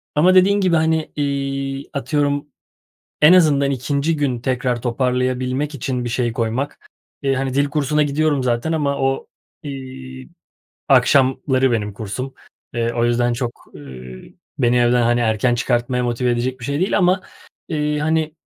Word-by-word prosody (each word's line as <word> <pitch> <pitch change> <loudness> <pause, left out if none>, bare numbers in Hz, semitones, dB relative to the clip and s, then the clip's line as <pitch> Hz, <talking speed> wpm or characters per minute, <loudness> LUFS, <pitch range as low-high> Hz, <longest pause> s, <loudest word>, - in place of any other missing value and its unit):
ama 180 +5 +4
dediğin 200 +2 +5
gibi, 185 -3 +2
hani, 160 0 +1
iii, 135 -1 -3
atıyorum 145 0 -1 0.8
en 150 +3 +8
azından 145 -6 +4
2'nci 140 +4 -1
gün 135 -5 -1
tekrar 125 -1 -1
toparlayabilmek 130 +3 -1
için 125 -2 -3
bir - - -2
şey 120 0 -1
koymak. 115 +5 -3 0.4
Eee, 135 -1 +1
hani, 135 0 -2
dil 140 +1 +2
kursuna 150 0 +1
gidiyorum 145 -1 +1
zaten 120 +5 0
ama 145 -3 0
o, 135 0 -1 0.4
iii, 130 -1 -8 0.6
akşamları 130 0 +3
benim 105 -3 -1
kursum. 115 +6 -6 0.4
Eee, 115 0 0
o 120 0 0
yüzden 120 0 +1
çok, 120 0 -2 0.2
ııı, 65 -4 -10 0.4
beni 125 -2 +2
evden, 120 0 +3
hani, 120 +1 +2
erken 115 +1 +1
çıkartmaya 120 +1 0
motive 120 +1 0
edecek 125 +2 -2
bir - - -7
şey 140 +2 -2
değil 190 +2 +1
ama 185 0 +3 0.5
iii, 150 -2 -1
hani, 160 0 0
130 Hz, 150 wpm, -20 LUFS, 120-145 Hz, 0.8 s, en